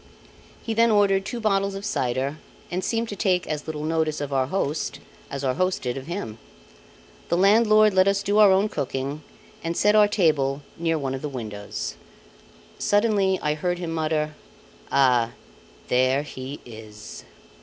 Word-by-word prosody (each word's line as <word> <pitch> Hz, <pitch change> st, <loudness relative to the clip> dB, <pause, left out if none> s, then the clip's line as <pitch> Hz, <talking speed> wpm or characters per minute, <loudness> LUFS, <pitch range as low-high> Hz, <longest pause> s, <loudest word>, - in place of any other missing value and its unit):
He 225 Hz, -, -2 dB
then 230 Hz, +1 st, +4 dB
ordered 200 Hz, -2 st, +3 dB
two 240 Hz, -, -4 dB
bottles 195 Hz, -2 st, +1 dB
of 195 Hz, +1 st, -6 dB
cider, 135 Hz, -, -1 dB, 0.3 s
and 180 Hz, +1 st, -2 dB
seemed 230 Hz, 0 st, -1 dB
to 205 Hz, -, -5 dB
take 185 Hz, -3 st, +1 dB
as 150 Hz, -1 st, -4 dB
little 150 Hz, -1 st, -4 dB
notice 160 Hz, -1 st, 0 dB
of 145 Hz, -1 st, -4 dB
our 130 Hz, -1 st, +1 dB
host 150 Hz, -4 st, -2 dB, 0.3 s
as 140 Hz, 0 st, -5 dB
our 130 Hz, -1 st, +1 dB
host 185 Hz, +5 st, 0 dB
did 125 Hz, -1 st, -2 dB
of 135 Hz, +1 st, -7 dB
him. 115 Hz, -, -5 dB, 0.9 s
The 170 Hz, -, +2 dB
landlord 215 Hz, +2 st, +5 dB
let 185 Hz, 0 st, +4 dB
us 200 Hz, 0 st, +2 dB
do 205 Hz, +2 st, +2 dB
our 205 Hz, -2 st, +8 dB
own 195 Hz, +2 st, +3 dB
cooking 140 Hz, -3 st, -3 dB, 0.4 s
and 165 Hz, +1 st, -2 dB
set 210 Hz, +1 st, +4 dB
our 210 Hz, -1 st, +7 dB
table 150 Hz, -8 st, +1 dB
near 165 Hz, -1 st, 0 dB
one 135 Hz, -3 st, -3 dB
of 135 Hz, -, -5 dB
the 150 Hz, -, -3 dB
windows. 105 Hz, -6 st, -6 dB, 0.8 s
Suddenly 205 Hz, -3 st, +2 dB
I 150 Hz, -, +1 dB
heard 175 Hz, +4 st, -2 dB
him 175 Hz, -2 st, -4 dB
mutter: 155 Hz, -1 st, -1 dB, 0.6 s
"Ah! 125 Hz, -4 st, +3 dB, 0.6 s
there 130 Hz, +3 st, +2 dB
he 135 Hz, -1 st, -7 dB
is." 110 Hz, -2 st, -10 dB
160 Hz, 165 wpm, -24 LUFS, 135-195 Hz, 0.9 s, our